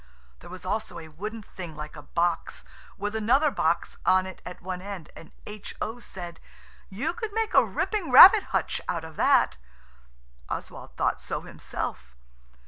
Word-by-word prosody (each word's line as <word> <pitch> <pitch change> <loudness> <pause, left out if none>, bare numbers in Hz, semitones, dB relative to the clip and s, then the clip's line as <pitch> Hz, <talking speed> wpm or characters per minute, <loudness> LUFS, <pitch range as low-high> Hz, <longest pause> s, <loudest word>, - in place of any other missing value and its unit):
There - - -13
was 185 +1 -10
also 205 -2 -3
a 160 -1 -9
wooden 210 +8 -6
thing 175 -5 -9
like 150 0 -8
a - - -9
box 175 0 -2 0.3
with 205 +2 -3
another 260 +8 +3
box 165 -6 0
on 185 0 +4
it 190 -1 -9
at 180 - -8
one 180 0 -5
end, 190 -5 -8
and 165 - -13
H.O. 215 +2 -6
said– 175 -7 -9 0.5
"You 230 - -2
could 445 +1 -5
make 445 0 -1
a - - +7
ripping 415 -9 -2
rabbit 380 - +10
hutch - - -1
out 170 -2 -1
of 160 -1 -10
that." - - +4 0.9
Oswald - - -7
thought - - 0
so - - -4
himself. 60 -1 -6
190 Hz, 160 wpm, -27 LUFS, 170-230 Hz, 0.9 s, rabbit